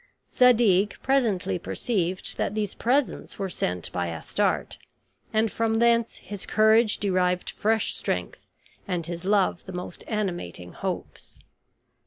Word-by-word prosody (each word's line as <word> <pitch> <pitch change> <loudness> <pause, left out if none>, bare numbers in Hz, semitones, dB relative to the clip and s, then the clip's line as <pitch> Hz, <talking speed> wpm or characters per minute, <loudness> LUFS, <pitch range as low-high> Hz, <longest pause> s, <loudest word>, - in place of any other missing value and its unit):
Zadig 220 -6 +4
presently 215 - +1
perceived 180 - -2
that 205 - -1
these 210 -2 -1
presents 265 +3 0
were 195 -2 -3
sent 90 - -2
by 90 -1 -2
Astarte; 80 - -1 0.5
and 220 0 +2
from 225 -1 0
thence 235 0 +3
his 205 -2 -8
courage 220 +1 +4
derived 180 -2 0
fresh 220 +1 +1
strength, - - -3 0.4
and 175 -4 -2
his 170 +1 -6
love 195 -3 +2
the 190 - -7
most 180 -1 -6
animating 175 - -3
hopes. - - -6
200 Hz, 125 wpm, -26 LUFS, 180-225 Hz, 0.5 s, Zadig